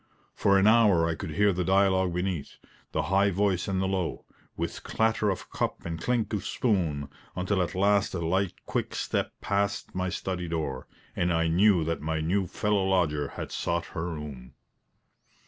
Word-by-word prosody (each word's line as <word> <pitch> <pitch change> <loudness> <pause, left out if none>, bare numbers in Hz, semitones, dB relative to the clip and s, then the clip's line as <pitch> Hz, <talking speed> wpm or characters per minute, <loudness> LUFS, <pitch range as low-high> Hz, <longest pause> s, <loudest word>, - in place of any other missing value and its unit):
For 100 -1 +3
an 95 - +4
hour 105 -7 +5
I 85 - 0
could 80 +2 -6
hear 105 +1 +4
the 90 +1 -1
dialogue 95 0 +3
beneath 90 -4 -3 0.3
the - - 0
high 100 +1 +3
voice 95 -2 +1
and 95 -1 0
the 95 - +1
low, 95 -3 -2 0.3
with - - -3
clatter 110 -1 +1
of 95 - -4
cup - - -2
and 85 -1 -4
clink 120 0 0
of 105 - -1
spoon, 85 - 0 0.3
until 95 +1 0
at 90 - -2
last 100 0 +2
a 85 -2 -2
light, 95 +2 -1
quick - - -2
step - - -1
passed 100 0 -1
my 95 0 -1
study 90 -1 -3
door, 75 -6 -3 0.3
and 90 0 +1
I 80 -1 +2
knew 90 +1 +4
that 80 -1 -2
my 80 +1 -1
new 90 +4 0
fellow 105 +2 0
lodger 80 -7 +1
had - - -5
sought 85 0 -1
her 85 0 -3
room. 75 -6 -8
95 Hz, 180 wpm, -28 LUFS, 80-100 Hz, 0.3 s, hour